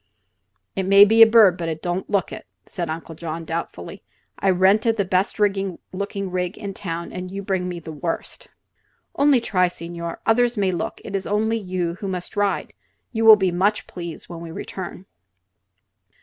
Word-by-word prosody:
"It 190 Hz, -1 st, -2 dB
may 200 Hz, +1 st, +8 dB
be 225 Hz, +2 st, +4 dB
a 225 Hz, -, +11 dB
bird, 215 Hz, -6 st, +6 dB
but 165 Hz, -1 st, -2 dB
it 160 Hz, -1 st, -5 dB
don't 175 Hz, +1 st, -2 dB
look 200 Hz, -3 st, 0 dB
it," -, -, -9 dB, 0.2 s
said 170 Hz, -3 st, -5 dB
Uncle 165 Hz, +1 st, -5 dB
John, 165 Hz, 0 st, -6 dB
doubtfully. 160 Hz, -, -5 dB, 0.4 s
"I 195 Hz, -, +2 dB
rented 195 Hz, +5 st, +3 dB
the 200 Hz, -, +1 dB
best 185 Hz, +3 st, 0 dB
looking 195 Hz, -3 st, 0 dB, 0.5 s
rig 180 Hz, +1 st, -2 dB
in 200 Hz, -2 st, -6 dB
town, 170 Hz, -3 st, -5 dB
and 180 Hz, 0 st, -5 dB
you 195 Hz, +1 st, -6 dB
bring 190 Hz, -2 st, -1 dB
me 175 Hz, -1 st, -5 dB
the 160 Hz, -1 st, -9 dB
worst." 165 Hz, -, -5 dB, 0.7 s
"Only 285 Hz, -2 st, +4 dB
try, 185 Hz, -6 st, +2 dB
signore! 170 Hz, -1 st, -6 dB
Others 240 Hz, +1 st, +2 dB
may 195 Hz, -2 st, +2 dB
look; 175 Hz, -, -4 dB
it 200 Hz, -, -5 dB
is 190 Hz, -, -2 dB
only 220 Hz, +2 st, +1 dB
you 180 Hz, -3 st, -3 dB
who 200 Hz, -, -4 dB
must 180 Hz, -2 st, -5 dB
ride. 205 Hz, -1 st, -1 dB, 0.4 s
You 225 Hz, -1 st, -1 dB
will 220 Hz, -1 st, +11 dB
be 190 Hz, -3 st, 0 dB
much 195 Hz, +5 st, +1 dB
please 170 Hz, -2 st, -8 dB
when 170 Hz, -1 st, -8 dB
we 170 Hz, -, -8 dB
return." 185 Hz, +1 st, -7 dB
185 Hz, 180 wpm, -22 LUFS, 170-205 Hz, 0.7 s, a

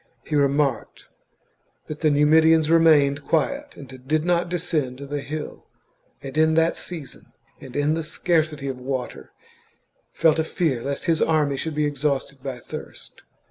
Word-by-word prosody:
He 155 Hz, -, -3 dB
remarked 140 Hz, -2 st, 0 dB, 0.8 s
that 155 Hz, -, -7 dB
the 155 Hz, -, +3 dB
Numidians 160 Hz, +2 st, +4 dB
remained 145 Hz, -4 st, +4 dB
quiet 280 Hz, -, -1 dB
and 140 Hz, -, -10 dB, 0.2 s
did 155 Hz, +2 st, +1 dB
not 175 Hz, 0 st, +1 dB
descend 160 Hz, -7 st, -2 dB
the 140 Hz, +1 st, -5 dB
hill, 150 Hz, +2 st, -7 dB, 0.6 s
and 135 Hz, 0 st, -7 dB
in 160 Hz, 0 st, +3 dB
that 165 Hz, +1 st, +3 dB
season, 160 Hz, -7 st, -8 dB, 0.3 s
and 130 Hz, -2 st, -12 dB
in 145 Hz, +1 st, +1 dB
the 165 Hz, -, -1 dB
scarcity 155 Hz, -2 st, -1 dB
of 130 Hz, -2 st, -4 dB
water, 125 Hz, -, -5 dB, 0.8 s
felt 160 Hz, -1 st, +2 dB
a -, -, +2 dB
fear 155 Hz, -6 st, -1 dB
lest 140 Hz, +2 st, -4 dB
his 165 Hz, -2 st, +1 dB
army 150 Hz, -3 st, +2 dB
should 155 Hz, +3 st, -4 dB
be 150 Hz, 0 st, +1 dB
exhausted 140 Hz, -1 st, -2 dB
by 135 Hz, -2 st, -5 dB
thirst. -, -, -10 dB
150 Hz, 150 wpm, -23 LUFS, 140-160 Hz, 0.8 s, Numidians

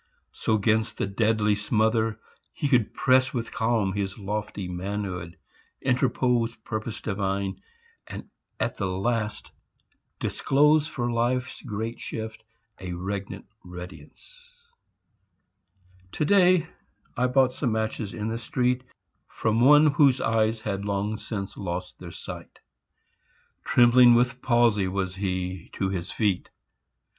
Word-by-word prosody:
So 110 Hz, -, 0 dB
'gainst 110 Hz, +1 st, +1 dB
the -, -, 0 dB
deadly 105 Hz, +1 st, +2 dB
smother 110 Hz, +1 st, +1 dB, 0.3 s
he 145 Hz, -, -1 dB
could 125 Hz, -6 st, +3 dB
press 130 Hz, +2 st, +3 dB
With 115 Hz, -1 st, -3 dB
calm 110 Hz, -4 st, +1 dB
his 100 Hz, -1 st, -3 dB
lofty 105 Hz, -1 st, -4 dB
manhood; 90 Hz, -1 st, -4 dB, 0.4 s
interpose 125 Hz, -2 st, +1 dB
Purpose 110 Hz, 0 st, -5 dB
divine, 100 Hz, -1 st, -2 dB, 0.5 s
and -, -, -8 dB, 0.3 s
at -, -, -1 dB
the 100 Hz, -, -1 dB
last 105 Hz, +3 st, -2 dB, 0.7 s
disclose 150 Hz, +2 st, +3 dB
For 120 Hz, -6 st, -2 dB
life's 125 Hz, +2 st, -1 dB
great 115 Hz, 0 st, -4 dB
shift 110 Hz, 0 st, -6 dB, 0.4 s
a 90 Hz, -1 st, -5 dB
regnant 100 Hz, +3 st, -5 dB, 0.2 s
readiness. 90 Hz, -, -12 dB, 1.6 s
To 150 Hz, -, 0 dB
day 185 Hz, -1 st, +4 dB, 0.5 s
I 125 Hz, +1 st, +2 dB
bought 130 Hz, 0 st, +3 dB
some 125 Hz, -4 st, -1 dB
matches 110 Hz, -1 st, -2 dB
in 105 Hz, -1 st, -3 dB
the 115 Hz, +1 st, -2 dB
street 125 Hz, +2 st, 0 dB, 0.4 s
From 110 Hz, 0 st, 0 dB
one 150 Hz, +5 st, +7 dB
whose 140 Hz, -3 st, +4 dB
eyes 110 Hz, -1 st, +1 dB
had 100 Hz, -2 st, -3 dB
long 100 Hz, +1 st, -1 dB
since 100 Hz, -3 st, -5 dB
lost 90 Hz, -1 st, -5 dB
their -, -, -8 dB
sight. -, -, -9 dB, 1.1 s
Trembling 120 Hz, 0 st, +6 dB
with 125 Hz, +1 st, +1 dB
palsy 120 Hz, -5 st, +3 dB
was 95 Hz, -1 st, -2 dB
he 90 Hz, -2 st, -3 dB
to 95 Hz, -, -1 dB
his 90 Hz, -3 st, -3 dB
feet. 100 Hz, -5 st, 0 dB
110 Hz, 120 wpm, -26 LUFS, 100-125 Hz, 1.6 s, one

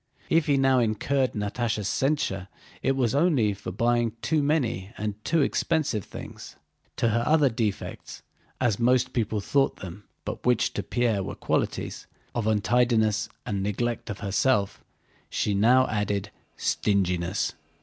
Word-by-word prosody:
If 165 Hz, -1 st, +3 dB
he 140 Hz, -2 st, +3 dB
now 135 Hz, -1 st, +4 dB
incurred 125 Hz, +4 st, +1 dB
Natásha's 105 Hz, 0 st, -2 dB
censure 100 Hz, -9 st, 0 dB, 0.3 s
it 135 Hz, -, +1 dB
was 125 Hz, -4 st, +1 dB
only 140 Hz, -, +3 dB
for 95 Hz, -1 st, -7 dB
buying 120 Hz, +2 st, +1 dB
too 155 Hz, -1 st, +2 dB
many 125 Hz, -, 0 dB
and 105 Hz, 0 st, -2 dB
too 165 Hz, -1 st, +2 dB
expensive 140 Hz, -, 0 dB
things. -, -, -9 dB, 0.4 s
To 115 Hz, -, +1 dB
her 115 Hz, +2 st, +1 dB
other 150 Hz, 0 st, +4 dB
defects 110 Hz, -4 st, -4 dB, 0.4 s
(as 120 Hz, -5 st, +1 dB
most 125 Hz, +1 st, +2 dB
people 110 Hz, -3 st, 0 dB
thought 135 Hz, +6 st, +1 dB
them, 95 Hz, +2 st, -9 dB, 0.2 s
but -, -, -5 dB
which 125 Hz, 0 st, +2 dB
to -, -, -2 dB
Pierre 120 Hz, -5 st, 0 dB
were -, -, -5 dB
qualities) -, -, -2 dB, 0.3 s
of 115 Hz, -3 st, -1 dB
untidiness 110 Hz, 0 st, +2 dB, 0.2 s
and 100 Hz, -2 st, -2 dB
neglect 115 Hz, +4 st, -2 dB
of 100 Hz, -, -5 dB
herself, 100 Hz, 0 st, +1 dB, 0.5 s
she 105 Hz, -, 0 dB
now 120 Hz, +6 st, +5 dB
added 105 Hz, -1 st, -1 dB, 0.3 s
stinginess. 90 Hz, -2 st, 0 dB
115 Hz, 140 wpm, -26 LUFS, 105-130 Hz, 0.5 s, now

